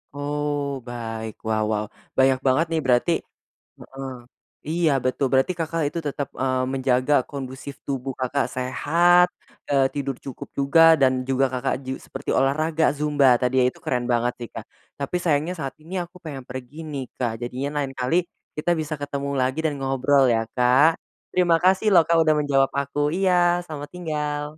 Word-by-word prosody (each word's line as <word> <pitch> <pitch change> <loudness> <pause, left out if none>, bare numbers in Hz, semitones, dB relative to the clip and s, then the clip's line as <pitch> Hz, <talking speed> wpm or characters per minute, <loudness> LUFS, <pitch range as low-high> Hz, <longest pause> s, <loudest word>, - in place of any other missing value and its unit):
Oh 145 0 -2 0.3
baik 115 -2 -5
wow 110 -1 +1
wow 105 0 -1 0.3
banyak 130 -1 +4
banget, 130 +6 +3
nih, 160 - +1
berarti 125 +6 +3 0.7
hmm, 135 0 -9 0.6
iya 165 -2 +2
betul 130 +2 +1
berarti 135 +7 +3
Kakak 165 0 -1
itu 170 - -3
tetap, 140 0 -3
eee, 130 -1 +1
menjaga 130 +1 +1 0.2
kondusif 135 0 -7
tubuh 135 -1 -3
Kakak 130 +2 0
sehat, 170 +8 +3 0.4
eee, 135 -1 +4
tidur 140 -2 -3
cukup 135 - -7
juga, 140 +4 +4 0.2
dan 130 -1 +5 0.2
juga 135 +1 +3
Kakak 130 +1 -1
ju 130 - -4
seperti 135 +1 -7
olahraga 155 +4 +1
Zumba 145 -2 +2
tadi, 125 +1 +1
ya, - - +4
itu, - - -17
keren 125 -1 0
banget, 120 +1 +1
nih, 120 - -7
Kak. - - -6 0.3
Tapi 140 +5 -3
sayangnya 160 +2 +1
saat 135 -2 -4
ini 175 +4 -11
aku 175 +1 -15
pengen 140 -5 -7
pergi, 130 +2 -8 0.2
nih, 135 -2 -3 0.2
Kak 120 -3 0
jadinya 130 +4 -3
lain 135 - -4
kali 125 +6 0 0.4
kita 150 +3 0
bisa 155 0 -3
ketemu 140 0 -3
lagi 130 +4 0
dan 150 - +1
ngobrol, 135 +1 +2
ya, 115 - +2 0.2
Kak. 125 +5 +5 0.5
Terima 175 -2 +4
kasih, 190 +3 +3
loh, 170 - +8
Kak, 170 - +3
udah 155 -1 +3
menjawab 135 -2 +2
aku, 140 +1 -3 0.2
iya 175 -2 +3
selamat 145 -3 -7
tinggal! 150 -4 -3
140 Hz, 170 wpm, -23 LUFS, 130-155 Hz, 0.7 s, loh